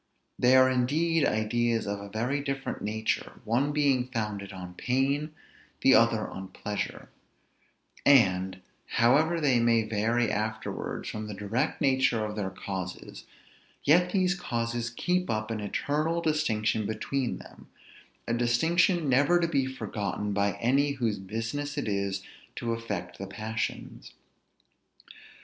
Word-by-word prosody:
They 125 +1 +5
are 130 0 +7
indeed 145 +5 +2
ideas 115 +1 0
of 100 0 -3
a 100 0 -8
very 120 +7 -1
different 135 -1 -4
nature, 110 +1 -2
one 125 +6 +1
being 140 -4 +2
founded 105 -5 -4
on 90 -2 -8
pain, 140 - 0 0.5
the - - +6
other - - +4
on 95 0 -7
pleasure; 105 +2 -5 0.9
and, 95 -8 +4 0.3
however 150 +8 +4
they 135 -6 +3
may 115 -1 +3
vary 110 +2 +1
afterwards 110 +1 -3
from 110 0 -5
the 105 - -6
direct 105 +5 -2
nature 130 -5 +2
of 105 0 -5
their 100 -3 -2
causes, 95 -1 -6 0.6
yet 175 +4 +4
these 185 -2 +2
causes 120 -8 -2
keep 180 +9 -1
up 110 0 -1
an 110 - -2
eternal 150 +10 -1
distinction 115 -10 0
between 120 +4 -2
them, - - -14 0.6
a 115 - 0
distinction 160 +8 +2
never 140 +7 +4
to 170 - +1
be 140 -5 +1
forgotten 105 -5 -3
by 100 0 +1
any 140 +4 +2
whose 115 -7 -1
business 115 +9 -4
it 140 - -2
is 100 -1 -1 0.3
to 115 - -2
affect 100 -6 -5
the 95 - -5
passions. 110 +3 -5
120 Hz, 135 wpm, -28 LUFS, 105-140 Hz, 0.9 s, are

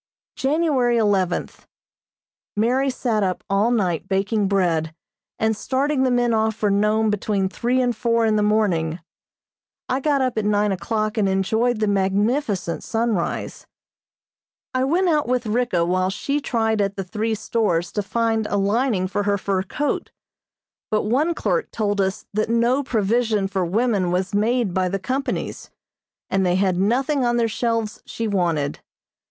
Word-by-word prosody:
January 270 -4 +1
eleventh: 200 -5 0 0.9
Mary 255 +5 +2
sat 235 -4 -1
up 185 -2 -1
all 200 +4 +3
night 190 -7 0
baking 195 +2 0
bread, 165 -5 0 0.4
and 220 0 +1
starting 265 +5 0
the 260 - +3
men 245 -1 +2
off 220 0 +1
for 215 -2 0
Nome 210 +2 +2
between 205 -1 0
three 245 +6 0
and 245 -2 +1
four 230 0 +1
in 220 -1 +2
the 210 - +2
morning. 185 -6 +1 0.9
I 260 - 0
got 285 0 +1
up 255 -4 0
at 210 - -2
nine 210 0 +2
o'clock 215 +3 -1
and 200 -2 +2
enjoyed 220 +5 +1
the 215 - +2
magnificent 200 - 0
sunrise. 225 -5 -2 1.1
I 255 0 +1
went 350 +7 +2
out 305 -5 +2
with 250 -1 0
Ricka 215 -6 +1
while 185 +1 +1
she 280 +9 -2
tried 225 -5 0
at 200 0 -1
the 195 - -3
three 220 +4 -2
stores 200 -6 -1
to 205 - -1
find 225 +1 0
a 205 - -1
lining 205 0 +1
for 200 +2 -1
her 200 0 +1
fur 195 -1 -1
coat, 290 +9 -2 0.8
but 215 -1 +1
one 285 +10 +1
clerk 480 - -1
told 205 -2 -1
us 190 0 -2
that 215 +1 0
no 235 +4 +2
provision 220 -4 +1
for 190 -1 -1
women 200 0 +1
was 185 +2 -1
made 220 -1 +1
by 185 0 +1
the 195 - -1
companies, 260 +7 -3 0.6
and 195 0 +1
they 180 -1 +2
had 185 -1 +1
nothing 260 +7 +1
on 240 0 +1
their 235 -1 +2
shelves 230 -1 -2
she 230 - -3
wanted. 170 -8 0
215 Hz, 160 wpm, -22 LUFS, 195-240 Hz, 1.1 s, all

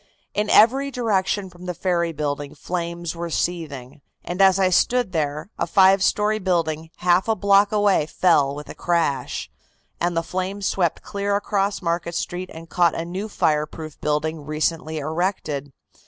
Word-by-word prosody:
"In 210 0 -1
every 265 +6 +5
direction 205 -6 0
from 175 +1 -12
the 180 - -3
ferry 170 -1 0
building 145 -2 -4
flames 170 -1 -4
were 170 0 -4
seething, 150 -6 -3 0.2
and 180 +2 -3
as 190 -1 +6
I 190 -1 +2
stood 245 +3 +2
there, 155 +2 -2
a 170 - 0
five 190 +1 +5
story 210 +2 +2
building 165 -4 -1
half 180 +2 +2
a 225 - +2
block 200 +1 +4
away 205 -7 +2
fell 145 -6 +2
with 150 0 -8
a - - -7
crash, 170 -5 -1 0.5
and 175 0 0
the 165 - +1
flames 190 +3 -3
swept 175 -4 0
clear 200 0 -2
across 200 -1 -1
Market 170 0 -1
Street 180 +1 -3
and 165 +1 -10
caught 170 -1 +2
a 165 - -3
new 190 +5 -5
fireproof 155 -3 -1
building 150 +1 -1
recently 155 +1 -2
erected. 155 -2 -2
175 Hz, 160 wpm, -23 LUFS, 160-195 Hz, 0.5 s, as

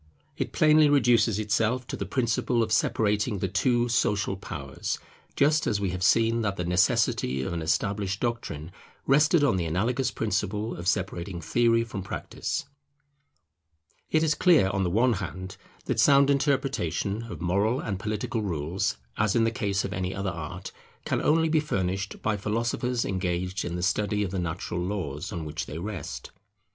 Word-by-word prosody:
It - - -3
plainly 155 -1 +5
reduces 120 -6 +4
itself 110 +4 0
to - - -5
the 100 - -4
principle 120 +1 +1
of 110 - -4
separating 105 0 +1
the 95 - -1
two 120 +6 +1
social 105 -4 +1
powers; 70 -8 -5 0.4
just 150 +2 +3
as 105 - +1
we 100 -2 -1
have 90 0 -5
seen 115 +4 +3
that 100 -3 -1
the 90 - -3
necessity 85 -6 +1
of 75 - -3
an 85 - -3
established 100 +4 -1
doctrine 105 -10 -3 0.3
rested 150 +3 +4
on 135 -10 +3
the 85 - -1
analogous 120 - 0
principle 105 0 -2
of 85 +1 -6
separating 90 -1 -1
theory 115 +7 +2
from 105 -4 -6
practice. 100 - -4 1.4
It 160 0 +2
is 155 -1 +3
clear, 160 - +4
on 95 -1 0
the 90 - 0
one 115 +7 +3
hand, 95 0 -5 0.3
that - - -1
sound 140 0 +6
interpretation 135 - 0
of 85 - -7
moral 100 +8 +1
and 100 -7 -3
political 110 +2 -2
rules, 85 -5 -2 0.2
as 105 -2 +1
in 115 - +4
the 115 - +2
case 100 -5 -1
of 100 - -4
any 95 -1 -3
other 100 -1 -2
art, 85 +3 -7 0.3
can - - 0
only 160 +1 +3
be 160 0 +3
furnished 100 -8 -2
by 110 -1 +1
philosophers 115 +4 -1
engaged 90 0 -2
in 85 - -4
the 90 - -3
study 105 +1 +1
of 95 - -3
the 95 - -2
natural 85 +1 -3
laws 90 -4 -3
on 85 -2 -4
which 75 +1 -4
they 75 - -6
rest. 90 -3 -6
100 Hz, 170 wpm, -27 LUFS, 90-120 Hz, 1.4 s, sound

